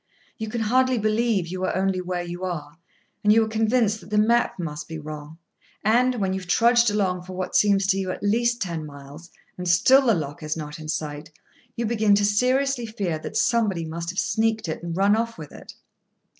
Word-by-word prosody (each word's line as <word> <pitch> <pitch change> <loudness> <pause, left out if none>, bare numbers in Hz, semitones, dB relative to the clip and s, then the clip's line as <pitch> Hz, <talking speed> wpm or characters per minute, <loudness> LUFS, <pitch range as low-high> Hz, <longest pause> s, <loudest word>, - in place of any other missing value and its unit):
You 220 -1 -4
can 235 +1 -3
hardly 255 +3 +2
believe 215 -2 +1
you 185 +2 -5
are - - 0
only 190 0 0
where 180 -1 -3
you 175 +1 -7
are, 160 -4 -5 0.4
and 210 - +5
you 225 +1 +5
are - - -6
convinced 220 0 +1
that 175 - -14
the 210 - 0
map 235 +3 +2
must 165 -2 -5
be 160 - -6
wrong; 155 0 -8 0.5
and, 245 +4 +3
when 195 -5 -1
you 190 - -2
have 180 -2 -12
trudged 235 +3 +4
along 190 -3 0
for 185 +1 -10
what 185 0 -4
seems 200 -2 +4
to 195 0 +2
you 190 -1 -3
at 185 - -5
least 235 +3 +1
ten 170 -4 -4
miles, 145 +3 -11 0.3
and 180 - -4
still 260 +10 +5
the 225 - +5
lock 145 -2 -5
is 155 +1 -3
not 150 0 -7
in 155 - -8
sight, 150 0 -4 0.5
you 235 - -2
begin 215 -2 +3
to 205 0 +2
seriously 250 +4 +1
fear 195 -7 -3
that - - -5
somebody 210 -8 +1
must 170 +1 -5
have 185 - -6
sneaked 220 -1 0
it, 160 - -4
and 170 0 -5
run 200 +2 +4
off 230 +1 -2
with 155 -3 -9
it. - - -12
195 Hz, 215 wpm, -24 LUFS, 170-225 Hz, 0.5 s, and